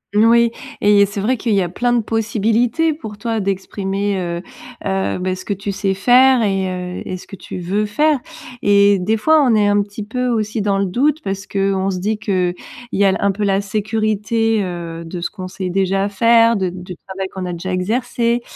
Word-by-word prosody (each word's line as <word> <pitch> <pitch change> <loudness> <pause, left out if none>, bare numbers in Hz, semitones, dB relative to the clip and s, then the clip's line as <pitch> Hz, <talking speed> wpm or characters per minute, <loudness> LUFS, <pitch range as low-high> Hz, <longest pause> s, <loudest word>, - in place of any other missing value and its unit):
N 210 - +5
oui. 235 0 +5 0.3
Et 205 -1 +5
c'est 200 +1 -6
vrai 235 +6 +1
qu'il 225 0 -1
y 195 - +3
a 180 - -1
plein 240 +7 0
de 240 -1 +2
possibilités, 225 +7 +1
pour 220 -9 -9
toi 225 +1 -2
d'exprimer, 195 +1 -2
heu, 170 -2 -3 0.4
heu, 190 0 -1
bah, 185 0 -1
ce 185 - -9
que 205 - -2
tu 200 +1 -4
sais 195 -1 0
faire 250 +5 +5
et 195 -2 0
heu 180 0 -5
et 185 - -4
ce - - -13
que 195 - -9
tu 185 - -8
veux 195 +4 -1
faire. 295 +7 +2 0.4
Et 200 -1 +4
des 215 +5 0
fois 315 +8 +4
on 245 - +3
est 210 -1 +3
un 205 0 +3
petit 205 +1 -6
peu 250 +4 -2
aussi 215 -2 -1
dans 200 -1 +1
le 195 - +1
doute 285 - +1
parce 195 0 -4
qu'on 195 -1 0
se 185 - -3
dit 215 +3 -1
que, 185 -4 0 0.4
il - - -1
y - - +5
a 195 - +5
l 190 - +1
un 200 - +2
peu 205 +2 -4
la 195 -1 +2
sécurité, 215 +1 0
heu, 170 -2 -5
de 175 +2 -6
ce 170 - -3
qu'on 185 -2 -8
sait 185 -1 -4
déjà 195 +1 +1
faire, 230 +3 +4
de 190 -3 0
du 180 0 -8
travail 190 0 -4
qu'on 190 -1 -4
a 180 - -3
déjà 185 +2 -4
exercé 235 +4 0
200 Hz, 225 wpm, -18 LUFS, 190-225 Hz, 0.4 s, N